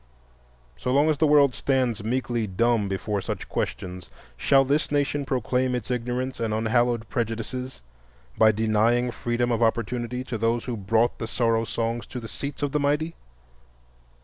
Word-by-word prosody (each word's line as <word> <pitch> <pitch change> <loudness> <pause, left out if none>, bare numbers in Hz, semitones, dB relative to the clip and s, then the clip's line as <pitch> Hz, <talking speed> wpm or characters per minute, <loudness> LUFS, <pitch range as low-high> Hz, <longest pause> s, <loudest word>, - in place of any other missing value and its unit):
So 125 - -2
long 145 +4 +4
as 145 - -2
the 155 - +4
world 145 -3 +5
stands 125 -7 0
meekly 120 -1 -1
dumb 110 +2 +1
before 100 +1 -2
such - - -5
questions, 90 -1 -4 0.3
shall 135 - +4
this 145 +3 0
nation 145 0 0
proclaim 125 0 0
its 120 0 -4
ignorance 125 +2 -2
and 110 -2 -1
unhallowed 115 +1 +1
prejudices 120 - -4 0.5
by 110 0 +6
denying 110 +3 +2
freedom 120 +1 -1
of 115 0 0
opportunity 120 +2 0
to 125 -4 -5
those 115 +1 0
who 125 - -3
brought 110 +3 +1
the 115 - -3
Sorrow 115 -1 +1
Songs 115 +1 -2
to 125 - -6
the 115 - -8
Seats 140 +4 -6
of 145 - 0
the 150 - +1
Mighty? 150 +3 0
120 Hz, 160 wpm, -25 LUFS, 115-130 Hz, 0.5 s, by